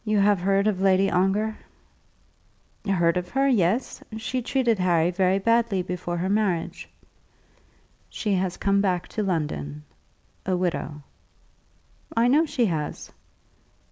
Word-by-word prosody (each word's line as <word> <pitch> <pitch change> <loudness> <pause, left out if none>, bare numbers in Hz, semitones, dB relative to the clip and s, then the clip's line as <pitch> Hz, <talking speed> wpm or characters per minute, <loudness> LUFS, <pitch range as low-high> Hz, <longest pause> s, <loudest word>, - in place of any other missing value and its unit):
"You 215 -1 0
have 200 -1 +4
heard 195 +2 +2
of 205 -3 0
Lady 195 0 +3
Ongar?" 200 +4 +1 1.3
"Heard 170 -3 +2
of 180 0 -3
her; 270 +4 +1
yes. 225 -1 +1 0.2
She 250 +3 -3
treated 240 -3 +1
Harry 175 -2 +2
very 185 +1 +2
badly 230 -2 +1
before 175 -1 -4
her 180 +2 -1
marriage." 195 -5 -1 1.2
"She 210 -2 -2
has 185 -1 -1
come 200 0 +2
back 180 -3 0
to 215 - -3
London, 75 - -3 0.6
a 185 -1 0
widow." 165 -4 -3 1.1
"I 230 +1 +4
know 310 +5 +4
she 255 -5 +1
has. 155 -6 -3
195 Hz, 130 wpm, -25 LUFS, 180-215 Hz, 1.3 s, have